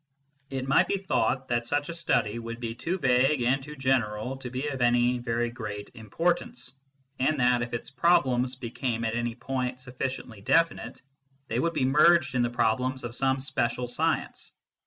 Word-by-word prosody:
It 135 -1 -4
might 135 - +4
be 200 - 0
thought 130 -8 0
that 120 -1 0
such 145 +3 -1
a - - -3
study 115 -9 0
would 115 0 -6
be 115 -2 -4
too 170 +10 -3
vague 130 -2 +3
and 130 +3 +2
too 150 +3 -9
general 130 -3 0
to 130 -2 -7
be 130 +3 -3
of 135 -3 -4
any 120 +1 +3
very 120 -1 -1
great 105 -4 -7
importance, 125 - -2 0.5
and 145 +3 +1
that, 125 -1 +3
if 120 0 -3
its 120 +4 -5
problems 130 -4 +2
became 120 -1 -3
at 110 - -1
any 120 0 -2
point 125 0 -3
sufficiently 125 -3 -5
definite, 165 +9 +1 0.5
they 115 - 0
would 170 +4 0
be 130 - +1
merged 150 +2 +5
in 125 - +1
the 120 - +1
problems 120 +2 0
of 120 -1 -5
some 135 +1 +1
special 125 -2 -1
science. 120 - -2
125 Hz, 180 wpm, -27 LUFS, 120-135 Hz, 0.5 s, merged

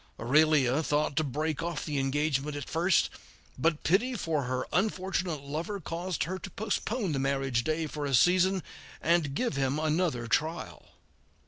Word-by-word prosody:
Aurelia 145 +2 +4
thought 150 -2 0
to 155 - +3
break 155 +2 -2
off 170 -2 -3
the 145 -3 -1
engagement 145 +1 0
at 145 - -5
first, 170 +3 +2 0.4
but 160 +3 0
pity 225 +10 +2
for 160 - -1
her 130 0 -2
unfortunate 185 -4 0
lover 165 +9 -4
caused 175 +1 -3
her 185 +3 -4
to 195 - -7
postpone 210 +1 -2
the 140 - -1
marriage 135 -3 0
day 155 +4 0
for 150 -1 -4
a 135 - +2
season, 185 +4 +4 0.4
and 160 -4 +1
give 245 - -1
him 135 +1 +1
another 155 -5 0
trial. 160 +7 -2
155 Hz, 155 wpm, -29 LUFS, 140-180 Hz, 0.4 s, Aurelia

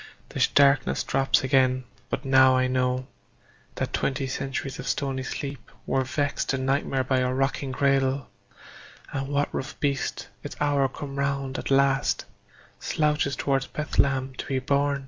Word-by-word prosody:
The - - +2
darkness 140 0 +4
drops 135 0 +2
again; 130 -1 +3 0.3
but - - -3
now 130 -1 +6
I 130 - +3
know 130 0 0 0.7
That - - -3
twenty 135 0 0
centuries 135 +1 -4
of - - -6
stony 135 -2 -1
sleep 135 -2 -6 0.2
Were 135 - +1
vexed 145 +2 -1
to 135 - +1
nightmare 135 0 0
by 130 0 +1
a 125 0 +1
rocking 135 +1 -1
cradle, 135 0 +1 0.9
And 135 -1 -2
what 145 0 0
rough 135 - -5
beast, 140 -2 -1
its - - -7
hour 145 -2 +2
come 140 +1 -7
round 140 -1 -1
at - - -5
last, 135 0 +2 0.5
Slouches 150 -3 0
towards 135 0 0
Bethlehem 135 -3 0
to - - -3
be 135 - 0
born? 140 +2 +1
135 Hz, 150 wpm, -26 LUFS, 130-140 Hz, 0.9 s, now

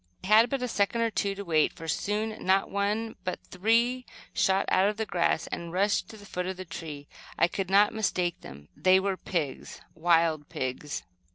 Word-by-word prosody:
I - - -5
had 220 +3 +6
but 270 -1 -2
a - - 0
second 220 +1 0
or 230 -1 +1
two 200 -2 -1
to 200 0 -7
wait, 160 -3 +3
for 165 - -10
soon, 215 +6 -2
not 190 +1 +2
one 210 +3 -1
but 185 - -3
three 235 +6 +1 0.3
shot 195 +1 +2
out 190 +2 +4
of 210 - -4
the 220 - -1
grass 170 -4 +1
and 170 -1 -6
rushed 200 +3 +1
to 220 - -10
the 205 - -13
foot 180 -2 -4
of 190 0 -4
the 185 - -7
tree. 155 -4 -8 0.3
I 170 - +4
could 190 +1 -4
not 205 +2 +5
mistake 180 -5 -1
them. 70 +2 -12
They 185 +5 +5
were 195 0 -1
pigs, 165 -7 -4
wild 165 -2 +2
pigs. 130 +3 -4
190 Hz, 200 wpm, -28 LUFS, 170-210 Hz, 0.3 s, had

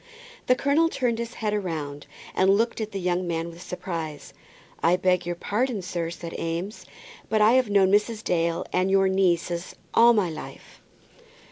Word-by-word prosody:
The 255 - +5
colonel 290 +5 +2
turned 240 -6 -1
his 235 +1 -5
head 215 -2 -2
round, 145 -5 -5 0.3
and 190 - +3
looked 225 +4 +2
at 215 0 -4
the 195 - -4
young 180 0 -1
man 165 0 -2
with 170 +1 -13
surprise. 165 -5 -6 0.5
"I 170 +2 +4
beg 180 -1 +1
your 175 - -2
pardon, 215 +3 -1
sir," 170 -2 -3
said 170 0 -7
Eames, 170 +6 -4 0.4
"but 220 - +2
I 210 +1 +6
have 255 -3 +3
known 195 -2 +4
Mrs. 210 +2 +1
Dale 170 -1 0
and 185 +1 +2
your 195 0 +4
nieces 175 -2 0 0.2
all 235 +1 +7
my 195 -6 +1
life." 155 - -10
185 Hz, 170 wpm, -25 LUFS, 170-215 Hz, 0.5 s, all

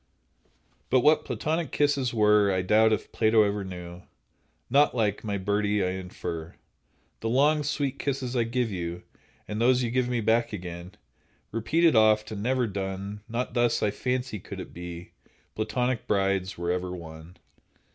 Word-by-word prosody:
But 130 - +4
what 150 +3 +4
Platonic 160 -1 -2
kisses 140 -4 +1
were 105 -2 +4
I 95 -1 0
doubt 110 +4 +4
if 110 -1 -1
Plato 110 -1 +4
ever 100 0 -1
knew— 90 -1 -8 0.7
Not 140 -2 +4
like, 105 -4 0
my 105 -2 -2
birdie, 105 +1 0
I 90 - 0
infer, 90 -3 -6 0.6
The 115 - -2
long, 145 +5 +3
sweet 145 -2 -2
kisses 130 -2 -2
I 120 - +3
give 120 -1 -1
you, 85 -1 -4 0.4
And 105 +2 -3
those 125 +1 +4
you 115 - -1
give 125 0 +1
me 120 -1 0
back 115 +1 +1
again, 90 -1 -7 0.6
Repeated 155 +8 +2
oft, 110 -1 +4
and 105 -2 -5
never 125 +2 +1
done; 100 0 -5
Not 120 +2 -3
thus, 120 -1 +2
I 105 - +2
fancy, 125 -1 -2
could - - -9
it - - -8
be 85 0 -8 0.4
Platonic 115 +3 -1
brides 95 -2 0
were 85 0 -1
ever 90 0 -2
won. 80 0 -11
110 Hz, 160 wpm, -27 LUFS, 95-125 Hz, 0.7 s, But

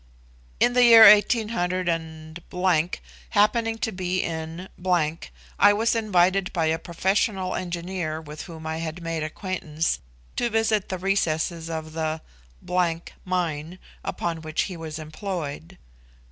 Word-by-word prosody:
In 245 - +4
the 250 0 +5
year 230 -2 +10
18__, 180 -5 +2 0.3
happening 225 +2 +2
to 225 - -2
be 185 -1 -1
in 165 +2 -5
_____, 170 -4 +1 0.4
I 205 +1 +7
was 225 +3 +1
invited 195 -3 +2
by 165 -3 0
a 160 +1 +1
professional 190 +2 0
engineer, 175 -2 -3
with 150 -1 -9
whom 160 -2 -10
I 160 0 -2
had 165 +1 -5
made 165 -1 -2
acquaintance, 160 - -2 0.4
to 240 - +1
visit 225 -2 +1
the 185 - -2
recesses 170 -3 0
of 160 -1 -5
the 160 0 -2 0.5
________ 175 -2 +1 0.3
mine, 170 -2 -2 0.3
upon 165 -2 -3
which 155 0 -1
he 185 - -5
was 160 -2 -6
employed. 155 - -6
175 Hz, 130 wpm, -25 LUFS, 160-195 Hz, 0.5 s, year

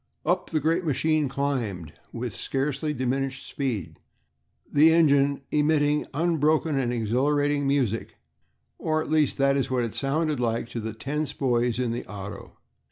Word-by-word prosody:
Up 180 +3 0
the 155 - +1
great 165 +5 +1
machine 155 -1 +1
climbed, 120 - -2 0.2
with 120 -3 -5
scarcely 140 +2 -2
diminished 135 0 -2
speed, 105 - -3 0.7
the 155 +3 +6
engine 140 -4 +3
emitting 150 0 +2
unbroken 155 0 +1
and 130 -3 0
exhilarating 140 +5 +1
music, 130 -6 0 0.6
or 155 -1 0
at 155 - -4
least 155 -3 +2
that 140 0 +3
is 135 -1 0
what 125 -2 +1
it 115 - -3
sounded 150 +1 0
like 115 -1 -1
to 120 - -4
the 110 0 -4
tense 145 +6 -3
boys 120 -3 +1
in 125 -2 0
the 120 - -3
auto. 100 -1 -8
140 Hz, 150 wpm, -26 LUFS, 120-150 Hz, 0.7 s, the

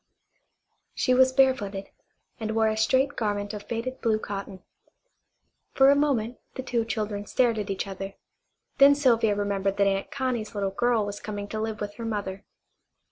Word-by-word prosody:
She 255 - +2
was 260 +1 +5
barefooted, 245 -8 +1 0.5
and 220 -1 -3
wore 220 -1 +3
a 215 - -1
straight 260 +5 +2
garment 205 -1 -2
of 210 - -5
faded 235 +4 -5
blue 225 -2 +2
cotton. 195 -3 -6 1.1
For 270 +1 +6
a - - +5
moment 250 -5 0 0.2
the 260 - -4
two 235 -3 -1
children 210 -2 -3
stared 235 -3 +2
at 205 -1 -4
each 195 - -2
other. 195 0 -6 0.6
Then 280 +1 +8
Sylvia 230 -7 +3
remembered 200 -1 -1
that 200 - +4
Aunt 195 0 0
Connie's 245 -5 -3
little 200 -1 -1
girl 230 +1 +1
was 205 0 -5
coming 205 -1 -5
to 215 - -3
live 220 -1 -3
with 205 -1 -4
her 230 - -5
mother. 200 -3 -4
220 Hz, 170 wpm, -26 LUFS, 205-250 Hz, 1.1 s, Then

